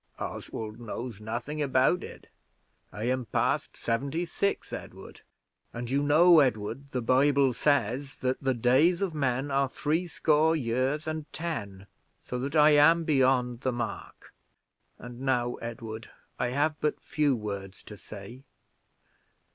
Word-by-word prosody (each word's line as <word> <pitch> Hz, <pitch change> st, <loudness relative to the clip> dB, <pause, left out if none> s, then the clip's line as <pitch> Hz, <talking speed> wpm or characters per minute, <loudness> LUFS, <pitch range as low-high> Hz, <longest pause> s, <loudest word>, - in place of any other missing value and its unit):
"Oswald 110 Hz, 0 st, -6 dB
knows 115 Hz, -1 st, -6 dB
nothing 120 Hz, +8 st, -4 dB
about 135 Hz, +5 st, +2 dB
it. -, -, -11 dB, 0.6 s
I 105 Hz, -, -6 dB
am 125 Hz, +1 st, 0 dB
past -, -, -1 dB
seventy 140 Hz, +9 st, -1 dB
six, 200 Hz, +4 st, -2 dB
Edward; -, -, -9 dB, 0.5 s
and 120 Hz, +1 st, -5 dB
you 140 Hz, +1 st, +2 dB
know, 160 Hz, +4 st, +6 dB
Edward, 125 Hz, +1 st, 0 dB
the 125 Hz, -3 st, -3 dB
Bible 135 Hz, +2 st, +3 dB
says 135 Hz, +1 st, 0 dB
that 130 Hz, 0 st, -2 dB
the 135 Hz, -2 st, +1 dB
days 145 Hz, -, +3 dB
of 185 Hz, -4 st, -2 dB
man 135 Hz, -1 st, -1 dB
are 135 Hz, 0 st, +2 dB
threescore 160 Hz, +1 st, +1 dB
years 130 Hz, +2 st, -1 dB
and 155 Hz, -1 st, -5 dB
ten; 100 Hz, -, -5 dB, 0.4 s
so 125 Hz, -, -4 dB
that 140 Hz, +4 st, -4 dB
I 150 Hz, 0 st, +7 dB
am 155 Hz, +3 st, +6 dB
beyond 130 Hz, -5 st, +2 dB
the 130 Hz, -, 0 dB
mark. 120 Hz, -2 st, -6 dB, 0.6 s
And 120 Hz, 0 st, -10 dB
now, 125 Hz, -2 st, 0 dB
Edward, 115 Hz, -1 st, -7 dB, 0.3 s
I -, -, +1 dB
have 145 Hz, +4 st, 0 dB
but 150 Hz, -, 0 dB
few 145 Hz, -3 st, +1 dB
words 100 Hz, -3 st, -6 dB
to 105 Hz, -, -10 dB
say. 100 Hz, +6 st, -10 dB
130 Hz, 140 wpm, -28 LUFS, 120-150 Hz, 0.6 s, I